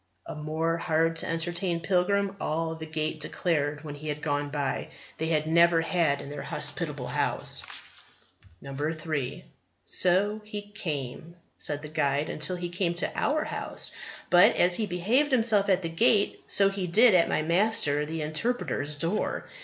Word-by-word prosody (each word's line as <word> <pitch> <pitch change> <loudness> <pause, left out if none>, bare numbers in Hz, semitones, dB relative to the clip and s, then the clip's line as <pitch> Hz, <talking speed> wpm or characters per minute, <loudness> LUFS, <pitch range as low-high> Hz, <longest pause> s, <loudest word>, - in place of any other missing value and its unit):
A - - -6
more 160 +2 -2
hard 165 0 +1
to - - -1
entertain 170 +1 -2
pilgrim, 195 +3 +1
all 160 +1 -1
the 160 0 -8
Gate 155 0 -3
declared 150 -2 -1
when 150 -2 -6
he 150 +2 -9
had 150 0 -3
gone, 145 -1 -1 0.7
they 160 - -1
had 155 -2 +1
never 170 +1 +4
had 165 -4 +1
in 140 - -8
their 145 -1 -6
hospitable - - -1
house. - - -2 1.0
3. 150 0 -3 0.4
"So 200 +4 +2
he 210 -1 -6
came," 165 - -6 0.2
said 145 0 0
the - - -5
guide, 145 -1 -1
"till 160 +5 +2
he 175 0 -4
came 175 -1 -1
to 175 - -2
our 305 +1 +1
House; - - -2 0.4
but 175 0 +7
as 180 0 +4
he 215 +3 +1
behaved 225 +12 +1
himself 225 -5 +3
at 190 -1 +2
the 165 - -2
Gate, 200 +4 +2
so 195 -1 +4
he 195 -2 -3
did 220 +6 +6
at 175 -2 +4
my 155 - 0
Master 170 -3 +2
the 160 +1 -4
Interpreter's 155 - -2
door. 165 +8 -1
165 Hz, 160 wpm, -27 LUFS, 155-190 Hz, 1.0 s, but